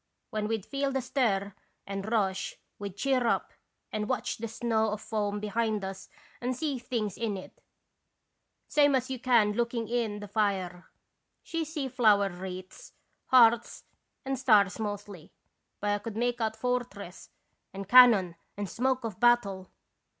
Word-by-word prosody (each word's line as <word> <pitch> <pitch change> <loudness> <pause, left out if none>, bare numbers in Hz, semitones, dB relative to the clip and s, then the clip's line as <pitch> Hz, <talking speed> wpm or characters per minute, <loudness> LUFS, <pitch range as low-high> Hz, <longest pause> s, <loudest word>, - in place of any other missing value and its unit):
When 215 -1 -2
we 225 +1 0
'd 200 - -13
feel 275 0 -1
the 265 - 0
stir 215 -7 0 0.3
and 195 +2 -5
rush 195 -4 0 0.2
we 200 0 -4
'd 195 - -16
cheer 255 +1 +1
up - - 0 0.4
and 210 0 -3
watch 255 - -1
the 230 - -3
snow 225 -1 0
of 210 0 -3
foam 210 -2 -2
behind 215 -1 -1
us 190 +1 -7 0.3
and 250 +1 -1
see 290 -4 -2
things 230 -5 -3
in 220 -4 -1
it, 185 - -12 1.1
same 290 -2 +4
as 255 +1 -1
you 260 - -3
can 235 -5 +4
looking 235 0 -1
in 225 -3 -1
the 205 - -8
fire. 190 -4 -1 0.6
She 330 -1 -2
see 305 -3 -4
flower 215 -6 +3
wreaths, 185 +1 -9 0.3
hearts, 235 -2 +4 0.4
and 270 -1 -2
stars 210 -7 +4
mostly, 205 -5 -6 0.5
but 205 0 0
I 205 - 0
could 220 0 -7
make 240 0 0
out 220 -1 0
fortress 240 -8 -4 0.4
and 195 0 -7
can 250 +3 +10
non 185 -6 0 0.2
and 205 -1 -3
smoke 255 +4 0
of 220 -5 -5
battle. 205 -6 +2
220 Hz, 160 wpm, -29 LUFS, 200-245 Hz, 1.1 s, can